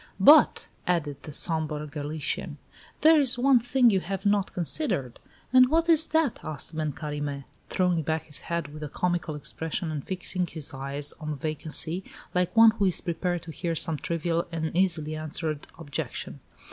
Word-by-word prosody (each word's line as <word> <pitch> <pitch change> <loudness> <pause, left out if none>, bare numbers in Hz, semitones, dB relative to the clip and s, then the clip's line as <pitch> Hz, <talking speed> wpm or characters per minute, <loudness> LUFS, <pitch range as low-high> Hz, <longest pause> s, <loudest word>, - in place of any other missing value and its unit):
"But," 295 +11 +7 0.2
added 150 -5 -1
the 150 - -9
sombre 155 -1 -1
Galician, 150 0 -4 0.4
"there 315 0 +7
is 260 -4 +3
one 260 0 +5
thing 245 0 +3
you 195 - +2
have 195 +3 -5
not 200 -1 +2
considered." 170 - -1 0.3
"And 255 0 +7
what 330 +2 +2
is 320 -1 +7
that?" 315 -6 +1
asked 155 +1 -5
Ben 155 -1 -1
Carime, 145 -2 -4 0.3
throwing 180 -3 +1
back 160 +1 -1
his 150 - -4
head 170 -4 -4
with 155 - -9
a 150 - -5
comical 175 -1 -1
expression, 160 +2 -4
and 150 -3 -4
fixing 185 -1 -2
his 155 -5 -6
eyes 140 +2 -3
on 150 -2 -4
vacancy, 155 +4 -2 0.3
like 180 +4 0
one 225 0 +9
who 215 -2 0
is 185 -3 +1
prepared 175 0 -2
to 165 - -8
hear 170 +1 -3
some 160 0 -1
trivial 170 +2 -1
and 160 -1 -3
easily 165 -4 +1
answered 155 -1 -3
objection. 145 -4 -5
165 Hz, 170 wpm, -27 LUFS, 150-190 Hz, 0.4 s, one